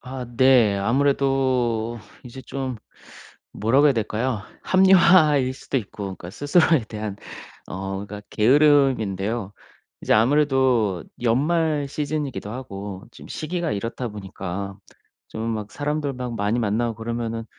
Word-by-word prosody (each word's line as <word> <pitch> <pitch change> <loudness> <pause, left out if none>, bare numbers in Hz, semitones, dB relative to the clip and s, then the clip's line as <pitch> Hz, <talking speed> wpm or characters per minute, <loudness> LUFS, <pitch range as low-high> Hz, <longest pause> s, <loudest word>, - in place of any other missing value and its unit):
아 130 -1 -7
네. 125 -6 +5
아무래도 125 -1 +1 0.3
이제 125 +2 -9
좀 130 -3 -4 0.8
뭐라고 130 +7 +3
해야 140 - +5
될까요? 110 +1 -1 0.2
합리화일 170 -8 +5
수도 135 - -4
있고 100 -1 -7
그러니까 95 -2 -7
스스로에 145 - +2
대한 105 -2 -5 0.5
어 95 +1 -5
그러니까 105 +1 -8
게으름인데요. 115 -6 +2 0.5
이제 - - +2
아무래도 125 - +2 0.2
연말 150 +4 +1
시즌이기도 145 -6 -3
하고 100 -4 -7
지금 - - -14
시기가 170 +1 -3
이렇다 115 +4 -4
보니까 100 -1 -6 0.5
좀 115 +1 -4
막 105 -1 -5
사람들 150 -1 -2
막 125 -2 -5
많이 105 +3 0
만나고 115 +1 0
그러면은 115 0 -4
120 Hz, 295 characters per minute, -23 LUFS, 105-140 Hz, 0.8 s, 네